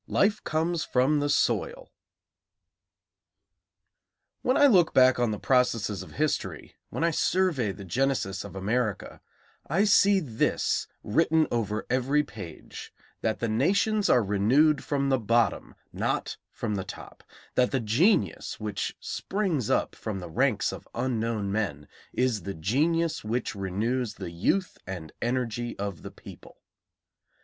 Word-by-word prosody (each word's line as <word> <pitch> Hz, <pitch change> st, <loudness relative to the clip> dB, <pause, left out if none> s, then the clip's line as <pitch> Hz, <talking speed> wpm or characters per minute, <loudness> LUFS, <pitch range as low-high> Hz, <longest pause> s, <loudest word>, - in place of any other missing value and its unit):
IV -, -, -15 dB
LIFE 205 Hz, +2 st, +2 dB
COMES 160 Hz, +1 st, 0 dB
FROM 135 Hz, +4 st, +2 dB
THE 145 Hz, 0 st, 0 dB
SOIL 485 Hz, -, 0 dB, 2.5 s
When 255 Hz, -, +2 dB
I 290 Hz, -, +6 dB
look 185 Hz, -, +4 dB
back 130 Hz, -1 st, +6 dB
on 120 Hz, -1 st, +2 dB
the 105 Hz, -, -2 dB
processes 115 Hz, -5 st, +1 dB
of -, -, -11 dB
history, 155 Hz, -1 st, -2 dB, 0.2 s
when -, -, -3 dB
I 170 Hz, -, +3 dB
survey 160 Hz, -, +1 dB
the 100 Hz, -, -9 dB
genesis 110 Hz, -4 st, -1 dB
of -, -, -10 dB
America, 110 Hz, +2 st, -2 dB, 0.5 s
I 180 Hz, +7 st, +2 dB
see 205 Hz, -1 st, +5 dB
this 125 Hz, -11 st, 0 dB, 0.2 s
written 160 Hz, +6 st, +3 dB
over 110 Hz, -2 st, -1 dB
every 130 Hz, +4 st, +2 dB
page: 100 Hz, -, -10 dB, 0.3 s
that 110 Hz, -, -1 dB
the 115 Hz, -, +1 dB
nations 200 Hz, -, +2 dB
are 125 Hz, -, +5 dB
renewed 125 Hz, +10 st, +3 dB
from 140 Hz, -1 st, 0 dB
the 135 Hz, -1 st, +2 dB
bottom, 115 Hz, +1 st, +1 dB, 0.2 s
not -, -, -2 dB, 0.2 s
from 110 Hz, -3 st, -3 dB
the 95 Hz, -2 st, -2 dB
top; -, -, -11 dB, 0.3 s
that 125 Hz, -1 st, +3 dB
the 135 Hz, -, 0 dB
genius 115 Hz, -, +1 dB
which 105 Hz, -2 st, -3 dB
springs 185 Hz, -, -2 dB
up -, -, +1 dB
from 105 Hz, -3 st, -5 dB
the 90 Hz, -3 st, -7 dB
ranks -, -, +1 dB
of -, -, -9 dB
unknown 115 Hz, -5 st, -1 dB
men 100 Hz, -9 st, -2 dB, 0.2 s
is 125 Hz, -5 st, 0 dB
the 100 Hz, +3 st, -5 dB
genius 155 Hz, -, 0 dB
which 115 Hz, +2 st, -2 dB
renews 105 Hz, +5 st, -2 dB
the 90 Hz, -4 st, -7 dB
youth 175 Hz, -, 0 dB
and 90 Hz, -5 st, -6 dB
energy 120 Hz, -1 st, -2 dB
of 100 Hz, -5 st, -4 dB
the -, -, -7 dB
people. -, -, -14 dB
120 Hz, 140 wpm, -27 LUFS, 105-155 Hz, 2.5 s, I